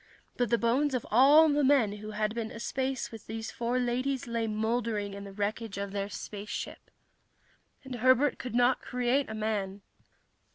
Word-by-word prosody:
But 245 -3 0
the 235 - +3
bones 260 +5 +1
of 250 - -2
all 285 +7 +7
the 295 -1 +2
men 255 -7 +3
who 215 +1 -8
had 215 0 -1
been 230 -1 -3
aspace 260 +2 -3
with 225 -2 -11
these 225 +1 -5
four 240 +1 -1
ladies 255 +2 -1
lay 230 -1 -2
mouldering 215 -1 -1
in 200 0 -7
the 200 - -8
wreckage 205 +1 -3
of 200 0 -4
their 200 0 -3
spaceship. 205 0 -6 0.9
And 265 -1 -8
Herbert 255 +4 +3
could 250 -2 -5
not 245 +1 +3
create 250 +2 0
a 220 - -5
man. 205 -2 -2
230 Hz, 170 wpm, -29 LUFS, 215-255 Hz, 0.9 s, all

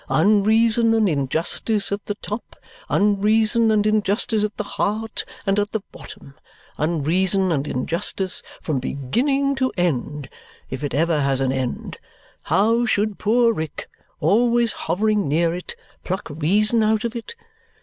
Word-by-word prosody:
Unreason 220 +5 +3
and 220 -2 +3
injustice 165 - -1
at 200 +1 -2
the 205 - -2
top, 210 +3 -6 0.3
unreason 215 +3 +3
and 210 -1 +2
injustice 215 +1 +1
at 210 0 -3
the - - -2
heart 210 +2 -2 0.2
and 195 0 +2
at 205 0 -2
the 220 - -1
bottom, 140 - -12 0.5
unreason 175 +5 +1
and 145 -2 -1
injustice 175 +7 -2 0.2
from 150 -5 -1
beginning 260 - 0
to 260 -1 0
end 150 -4 -1 0.4
if 130 +2 -5
it 140 -3 -2
ever 160 0 +2
has 135 -1 +1
an 135 -1 +1
end 130 -2 -4 0.5
how 225 +4 +2
should 215 -3 0
poor 230 +2 +3
Rick, 160 -6 -5 0.3
always 235 +6 +3
hovering 205 +3 0
near 165 +3 +1
it, 180 +1 -6 0.3
pluck 190 +2 -3
reason 205 +9 +2
out 215 0 +2
of 235 0 -3
it? 235 - -7
205 Hz, 140 wpm, -22 LUFS, 160-220 Hz, 0.5 s, Unreason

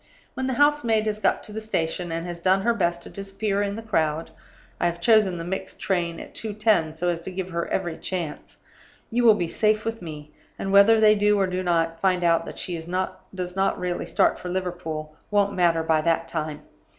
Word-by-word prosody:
When 260 - -3
the 260 - 0
house 290 +2 +3
maid 220 -2 +2
has 215 -1 -2
got - - +1
to - - -10
the 220 - -4
station, 175 -4 -2
and 165 +1 -3
has 175 -1 -6
done 190 +2 +2
her 235 - +3
best 175 -5 -1
to - - -10
disappear 200 +1 -2
in 200 0 -1
the 225 - -7
crowd 160 -6 0 0.5
(I - - +2
have 170 0 -3
chosen 205 -1 +4
the 165 - -5
mixed 190 +2 -5
train 170 -3 -1
at - - -10
2:10, 210 -7 0
so 175 +2 0
as 170 -1 -2
to 170 - -6
give 185 0 -4
her 170 0 -2
every 175 -4 -2
chance), 170 -5 -5 0.5
you 240 +2 +1
will 225 -3 +7
be 175 -4 -1
safe 215 +4 +1
with 225 -1 -3
me; 150 -3 -8 0.3
and 195 - -3
whether 200 +3 +7
they 215 -1 +7
do 210 0 +3
or 195 - +3
do 185 0 -2
not 165 -2 0
find 185 -2 +2
out 165 -1 +2
that - - -8
she 180 - -2
does 180 +1 -4
not 195 0 +1
really 180 -1 -3
start - - +2
for 180 - -6
Liverpool 175 -4 -4
won't 205 -1 +2
matter 170 -3 +2
by 160 -1 +2
that 165 +1 +1
time. 155 -2 -4
185 Hz, 220 wpm, -25 LUFS, 170-210 Hz, 0.5 s, will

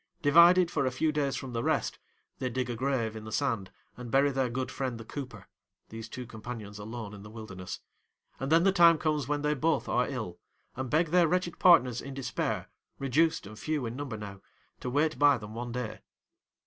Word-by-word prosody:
Divided 170 +4 +7
for 140 -3 +1
a - - 0
few 155 +5 +1
days 145 -2 0
from 130 -3 -6
the 115 - -1
rest, - - 0 0.4
they 130 - -1
dig 125 0 -2
a - - -3
grave 120 -3 -1
in 110 - -7
the 110 - -8
sand 115 -8 -1 0.3
and 125 -1 -8
bury 140 +3 +4
their 130 -2 0
good 130 +2 -3
friend 130 -3 -3
the 115 - -9
cooper—these 115 -4 -10
two 125 +1 -6
companions 110 -2 -8
alone 110 0 -6
in 100 - -10
the 105 - -11
wilderness—and 110 +6 -9
then 165 +1 +6
the 195 - +5
time 170 -3 +6
comes 150 -4 0
when 145 0 -1
they 150 0 +2
both 155 +3 0
are 125 - +1
ill, 110 -10 -5 0.4
and 130 0 -4
beg 160 +3 +2
their 175 0 +4
wretched 180 0 -1
partners 130 -10 +5
in 135 -1 -8
despair, 135 -2 -2 0.3
reduced 160 +3 +1
and 105 +2 -10
few 155 -4 -1
in 115 +1 -4
number 135 -5 -5
now, 100 -2 -8 0.4
to 125 - -4
wait 150 +4 +1
by 145 -2 +6
them 105 -1 -9
one 120 +1 -5
day. 125 -2 -4
130 Hz, 200 wpm, -29 LUFS, 115-150 Hz, 0.4 s, Divided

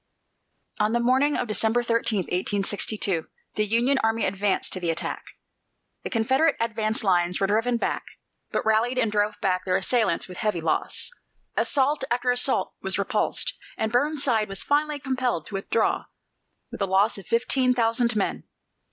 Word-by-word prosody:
On 210 +1 +2
the 235 - +2
morning 260 +5 +2
of 245 - -2
December 225 +2 +1
13, 230 -3 0
1862, 195 0 -1 0.3
the 215 0 0
Union 240 +6 +2
army 225 0 +1
advanced 195 +1 0
to 185 - 0
the 175 -2 -1
attack. 165 0 -2 0.8
The - - -3
Confederate 265 +7 +2
advance 220 -1 0
lines 180 -2 +2
were 195 - +2
driven 225 +4 +1
back, - - -1 0.5
but - - -2
rallied 225 +3 +2
and 230 -4 +1
drove 210 0 0
back 185 -1 +1
their 185 0 +1
assailants 195 -2 0
with 180 -1 -9
heavy 210 -5 0
loss. 160 - -1 0.4
Assault 280 +1 +1
after 245 +1 +1
assault 245 0 +1
was - - -1
repulsed, - - 0 0.2
and 220 - -1
Burnside 250 -4 +1
was 195 0 -5
finally 295 +1 +1
compelled 255 - -1
to - - -12
withdraw 195 +3 0 0.7
with - - -8
a 195 - +1
loss 195 +3 +2
of 190 - -13
fifteen 250 +2 +2
thousand 235 0 +2
men. 200 - -1
220 Hz, 160 wpm, -25 LUFS, 195-245 Hz, 0.8 s, On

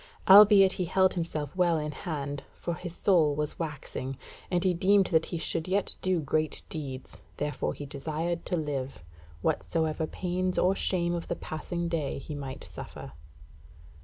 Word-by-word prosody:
Albeit 200 -1 +9
he 185 - -1
held 190 +2 +3
himself 160 -3 -3
well 175 -3 +3
in 150 -1 -3
hand, 145 -2 -4
for 170 - -3
his 175 0 -5
soul 160 -7 +3
was 150 0 -2
waxing, 140 -4 -5 0.3
and 180 -1 +1
he 185 -2 +3
deemed 195 +3 +4
that 160 -3 +2
he 170 - -3
should 165 0 -1
yet 195 +2 0
do 185 -2 +1
great 155 +1 0
deeds, 135 -4 -6 0.2
therefore 150 0 -2
he 145 - -7
desired 160 +4 -3
to 180 - -1
live, 135 - -4 0.4
whatsoever 160 -1 0
pains 185 +1 -2
or 185 +2 +3
shame 175 -3 0
of 170 -1 -4
the - - -2
passing 170 +2 -4
day 165 -4 -2
he 145 +2 -7
might 140 -2 -6
suffer. - - -9
165 Hz, 160 wpm, -29 LUFS, 150-180 Hz, 0.4 s, Albeit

